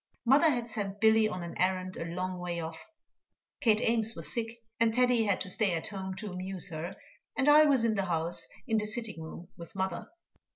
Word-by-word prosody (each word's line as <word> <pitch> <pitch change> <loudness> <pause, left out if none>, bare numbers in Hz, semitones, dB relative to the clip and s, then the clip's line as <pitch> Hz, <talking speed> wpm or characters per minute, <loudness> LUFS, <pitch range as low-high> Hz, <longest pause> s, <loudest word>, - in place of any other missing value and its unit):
Mother 280 +7 +6
had 240 -5 -1
sent 205 -3 -4
Billy 220 0 +5
on 180 -3 -5
an 170 - -7
errand 185 0 0
a - - -4
long 180 +2 -4
way 175 -1 -3
off, 160 0 -7 0.7
Kate 225 -6 +3
Ames 225 -1 +2
was 155 -2 -4
sick, 230 0 -4 0.2
and 230 0 +4
Teddy 245 -1 +3
had 200 -3 +1
to 185 - -3
stay 200 -5 +2
at 160 - -3
home 190 -2 -4
to 205 +1 -6
amuse 185 0 -2
her, 160 +2 -5 0.4
and 270 0 +2
I 300 +1 +8
was 275 -5 +3
in 230 -1 +2
the 195 -2 -1
house, 170 -1 -1 0.2
in 225 -4 +1
the 210 0 0
sitting 220 -5 -1
room 160 +2 -9
with 170 +2 -10
mother. 190 0 -2
200 Hz, 210 wpm, -30 LUFS, 180-230 Hz, 0.7 s, I